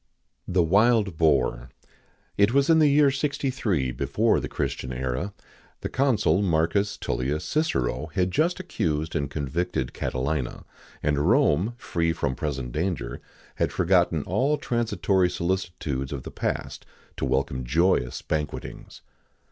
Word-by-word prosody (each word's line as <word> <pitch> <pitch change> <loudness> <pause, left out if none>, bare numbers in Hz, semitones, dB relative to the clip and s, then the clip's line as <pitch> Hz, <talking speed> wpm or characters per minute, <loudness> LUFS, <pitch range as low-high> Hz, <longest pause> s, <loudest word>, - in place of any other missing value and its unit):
[XIX - - -48
64] - - -5
THE 90 -2 +4
WILD 100 +1 +3
BOAR. 75 -6 +2 0.7
It 100 +3 +3
was 140 +3 +4
in 160 - +6
the 155 - +6
year 145 0 +5
63 130 - -1
before - - +1
the - - -4
Christian 65 - -3
era: 65 +9 -2 0.5
the - - -3
consul 115 - +2
Marcus 100 +3 +1
Tullius 65 +5 -2
Cicero 80 - 0
had 90 -1 +1
just 170 - +1
accused 80 - -2
and 70 -3 -1
convicted 75 -1 -2
Catilina, 65 0 -3 0.4
and 75 -1 +1
Rome, 95 +11 +3
free 85 -7 -1
from 70 -4 -1
present 65 -3 -4
danger, 80 -6 -3 0.4
had - - +1
forgotten 85 -4 +2
all 135 - +1
transitory 105 -8 +1
solicitudes 85 -7 -2
of 70 -3 -5
the - - -8
past - - -3 0.3
to - - -4
welcome 65 -1 0
joyous 70 -1 +1
banquetings. 75 -1 -5
85 Hz, 135 wpm, -25 LUFS, 70-105 Hz, 0.7 s, in